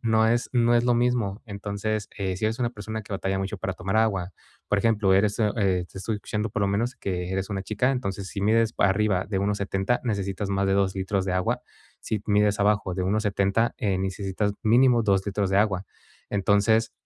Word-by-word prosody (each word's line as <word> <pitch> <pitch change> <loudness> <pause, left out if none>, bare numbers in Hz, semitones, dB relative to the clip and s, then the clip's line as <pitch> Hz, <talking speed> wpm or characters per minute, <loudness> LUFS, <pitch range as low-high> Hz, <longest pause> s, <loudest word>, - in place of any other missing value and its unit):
no 110 -1 +3
es 120 +1 0
no 120 -1 +3
es 120 - +3
lo 120 0 +3
mismo. 120 -4 0
Entonces, 105 +1 -3
eh, 95 -2 -2
si 110 - -3
eres 110 +2 0
una 120 - +2
persona 110 -1 -6
que 100 - -10
batalla 95 0 -1
mucho 95 +2 -3
para 95 - -2
tomar 95 +3 -3
agua, 100 -5 +1 0.4
por 100 - +2
ejemplo, 105 -3 +3
eres, 105 +2 +2
u 115 - +3
eh, 95 -4 +1
te - - -9
estoy 110 +2 -2
escuchando 105 +1 -3
por 100 - -3
lo 100 - +2
menos 115 +6 0
que 90 -1 -3
eres 95 +1 -2
una 95 -1 -2
chica, 110 +6 0
entonces, 100 -7 -3
si 100 - -5
mides 115 +2 +2
arriba 100 -1 +2
de 100 -2 -1
1.70, 100 +2 0
necesitas 100 -3 -2
más 100 0 +1
de 95 - +2
2 95 -1 +1
litros 95 0 -1
de 95 - -2
agua. 115 +7 0 0.4
Si 110 - -3
mides 105 -1 +2
abajo 100 -2 +2
de 95 - -2
1.70, 100 +2 +1
eh, 100 -3 0
necesitas 95 +2 -2
mínimo 120 +2 +4
2 100 -3 +2
litros 100 -1 -1
de 95 - +1
agua. 100 -3 +1 0.4
Entonces, 100 +3 +2
100 Hz, 210 wpm, -25 LUFS, 95-110 Hz, 0.4 s, mínimo